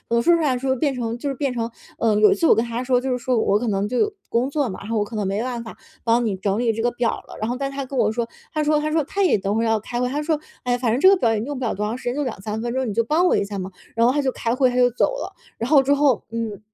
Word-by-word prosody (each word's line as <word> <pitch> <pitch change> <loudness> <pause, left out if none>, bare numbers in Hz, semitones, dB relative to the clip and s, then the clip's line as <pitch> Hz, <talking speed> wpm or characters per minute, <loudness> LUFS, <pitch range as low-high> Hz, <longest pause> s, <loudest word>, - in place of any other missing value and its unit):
能 235 - +3
说 345 +8 +4
出 335 - 0
来 280 -4 +2
的 250 - -2
时 270 - -4
候 260 - +2
变 275 +2 0
成 235 -2 -3
就 280 +3 -3
是 270 - -3
变 270 -1 -1
成 230 -1 -2 0.3
呃， 225 -2 +3
有 215 - +6
一 - - +3
次 335 - 0
我 - - +7
跟 225 - +1
他 235 +1 -3
说 250 -1 +2
就 260 0 -2
是 250 - +1
说 250 0 0
我 205 -2 +3
可 240 - -3
能 200 0 0
就 250 - -1
有 420 0 +1 0.2
工 245 +4 +1
作 285 -3 0
嘛， 185 - -6
然 205 - -8
后 225 - 0
我 205 - +1
可 225 - -9
能 210 -2 -1
没 195 +3 -1
办 245 -2 -3
法 225 - -10 0.3
帮 235 +1 +2
你 205 -4 0
整 195 +2 -1
理 235 -2 +1
这 225 - -3
个 240 +1 +1
表 240 -1 0
儿 - - -5
了， - - -10
然 215 +2 -2
后 245 - -1
但 275 +1 -3
是 275 - -9
他 275 - -2
跟 265 0 -6
我 215 - +3
说， 235 0 -2 0.2
他 305 - -1
说 300 0 +2
他 305 0 -1
说 320 - +2
他 395 +5 -1
也 360 - +4
等 200 +2 -2
会 225 - +1
儿 - - +1
要 225 -1 +2
开 240 +3 -4
会。 250 - +1
他 290 +3 -2
说： 315 -1 0 0.2
“哎 250 - -1
呀， - - +1
反 240 -3 0
正 245 - +1
这 375 - +6
个 390 - +6
表 240 -11 +1
儿 225 - +1
也 - - -2
用 285 +1 -4
不 255 - -4
了 225 - 0
多 210 +2 -2
长 225 +4 -3
时 - - -13
间， 245 - -1
就 290 - -1
2-3 215 -3 -4
分 240 0 -3
钟， 260 -1 -1
你 205 - -3
就 230 - +2
帮 315 +9 +2
我 - - +3
一 - - +1
下 200 0 -6
嘛。” 185 0 -4 0.3
然 230 0 +3
后 250 - +4
他 290 - +1
就 265 -2 0
开 230 -1 -2
会， 260 -1 +3
他 245 - -4
就 250 0 +5
走 245 - +2
了。 - - -6 0.2
然 230 - -3
后 285 -3 +7
之 280 +2 +3
后 285 -4 +2
嗯， 225 -3 -4
245 Hz, 400 characters per minute, -22 LUFS, 225-270 Hz, 0.3 s, 我